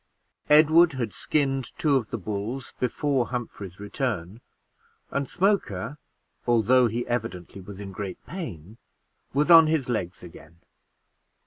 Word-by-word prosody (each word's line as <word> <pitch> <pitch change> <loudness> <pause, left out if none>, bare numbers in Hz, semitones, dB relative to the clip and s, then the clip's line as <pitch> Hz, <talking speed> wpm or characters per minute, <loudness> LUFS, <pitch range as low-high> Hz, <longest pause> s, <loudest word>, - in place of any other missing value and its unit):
Edward 155 +2 +6
had 120 -5 -3
skinned 135 -4 -1
two 150 -3 +2
of 125 -5 0
the 115 - -3
bulls 110 +6 -5
before 130 0 0
Humphrey's 105 -7 -6
return; 105 - -3 0.7
and 140 -2 -2
Smoker, 150 - 0 0.5
although 120 +2 +4
he 115 +2 -3
evidently 105 -6 -4
was 100 +1 -10
in 100 -1 -7
great 95 -1 -5
pain, 110 - -8 0.5
was 150 +5 +2
on 165 -1 +9
his 155 -5 0
legs 90 -8 -3
again. 85 -1 -14
120 Hz, 125 wpm, -26 LUFS, 100-140 Hz, 0.7 s, on